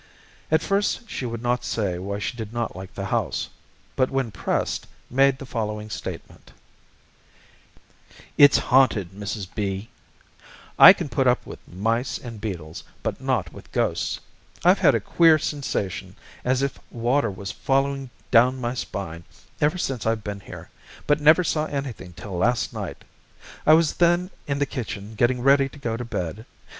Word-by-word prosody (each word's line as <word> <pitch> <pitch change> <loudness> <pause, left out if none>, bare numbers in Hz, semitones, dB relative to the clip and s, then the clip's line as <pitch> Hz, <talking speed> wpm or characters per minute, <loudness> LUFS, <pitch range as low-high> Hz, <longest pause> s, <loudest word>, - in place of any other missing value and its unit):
At 160 +1 +3
first 205 +3 0
she 125 - -3
would 115 0 -5
not 120 0 0
say 95 -6 -1
why 100 +2 -4
she 105 - -3
did 110 -3 -6
not 120 -4 -3
like 95 0 -9
the - - -4
house, - - -1 0.5
but 130 0 +2
when 135 -4 -1
pressed 95 - -2 0.2
made 135 +1 +4
the 135 - -8
following 105 -3 -4
statement: - - -8 1.8
"It's 145 -1 +8
haunted, 125 -9 +3
Mrs. 100 0 -5
B. 100 +2 -3 0.9
I - - +13
can - - -1
put - - +1
up - - +2
with - - -9
mice 115 +7 -1
and 115 -4 -9
beetles, 85 -7 -5 0.2
but - - -3
not 120 -11 -1
with - - -13
ghosts. - - -1 0.5
I've - - +6
had - - +5
a - - +2
queer 165 -2 +5
sensation, 100 - -3 0.3
as 130 +1 +1
if 140 - -2
water 120 +1 +1
was 100 +1 -6
falling 135 0 0 0.2
down 125 +2 +5
my 120 -1 -2
spine, 85 -9 -5 0.4
ever 150 +5 +2
since 135 -10 -2
I've 110 -1 0
been 100 -1 -5
here, - - -11 0.3
but 150 0 +2
never 155 +4 +6
saw 155 -2 0
anything 130 -11 -5
till 95 +2 -8
last 120 +5 +1
night. - - -6 0.6
I 155 - +8
was 165 -1 +3
then 175 +2 +2 0.2
in 140 -1 -1
the 145 - +1
kitchen 110 -5 -6
getting 120 +3 +1
ready 135 +1 +4
to - - -14
go 120 -5 -3
to 120 - -4
bed. 105 -2 -5
120 Hz, 165 wpm, -24 LUFS, 105-135 Hz, 1.8 s, I